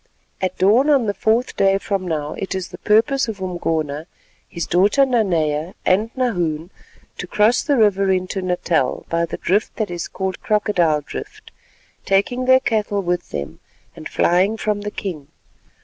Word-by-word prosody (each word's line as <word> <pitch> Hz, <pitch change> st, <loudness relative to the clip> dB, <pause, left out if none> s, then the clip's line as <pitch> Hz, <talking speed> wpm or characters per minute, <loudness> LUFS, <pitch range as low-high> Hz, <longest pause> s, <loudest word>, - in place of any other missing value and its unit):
At 185 Hz, -1 st, -2 dB
dawn 220 Hz, +10 st, +4 dB
on 275 Hz, -5 st, +4 dB
the 205 Hz, -, 0 dB
fourth 225 Hz, +4 st, 0 dB
day 195 Hz, 0 st, +3 dB
from 195 Hz, -2 st, -3 dB
now 150 Hz, -3 st, -2 dB
it 195 Hz, 0 st, -4 dB
is 185 Hz, -1 st, -4 dB
the -, -, -11 dB
purpose 225 Hz, +5 st, +2 dB
of 215 Hz, -3 st, -5 dB
Umgona, 160 Hz, -4 st, -2 dB, 0.4 s
his 170 Hz, -3 st, -4 dB
daughter 205 Hz, +10 st, +3 dB
Nanea, 170 Hz, -, 0 dB
and 210 Hz, +5 st, +2 dB
Nahoon, 175 Hz, -10 st, -1 dB, 0.5 s
to -, -, -5 dB
cross 215 Hz, +3 st, +3 dB
the 285 Hz, -3 st, +1 dB
river 200 Hz, -3 st, +3 dB
into 185 Hz, +1 st, -1 dB
Natal 175 Hz, -6 st, 0 dB
by 170 Hz, 0 st, +1 dB
the -, -, -5 dB
drift 205 Hz, +5 st, 0 dB
that 215 Hz, -5 st, -2 dB
is 175 Hz, -1 st, -4 dB
called 190 Hz, -1 st, -4 dB
Crocodile 185 Hz, -8 st, +1 dB
Drift, 145 Hz, -, -9 dB, 0.5 s
taking 225 Hz, +6 st, +1 dB
their 260 Hz, 0 st, +6 dB
cattle 210 Hz, -4 st, 0 dB
with 175 Hz, 0 st, -2 dB
them 70 Hz, -1 st, -6 dB, 0.4 s
and -, -, -8 dB
flying 190 Hz, +5 st, +2 dB
from 210 Hz, -1 st, -1 dB
the 210 Hz, -, -4 dB
king. 170 Hz, -9 st, -6 dB
195 Hz, 165 wpm, -20 LUFS, 175-215 Hz, 0.5 s, their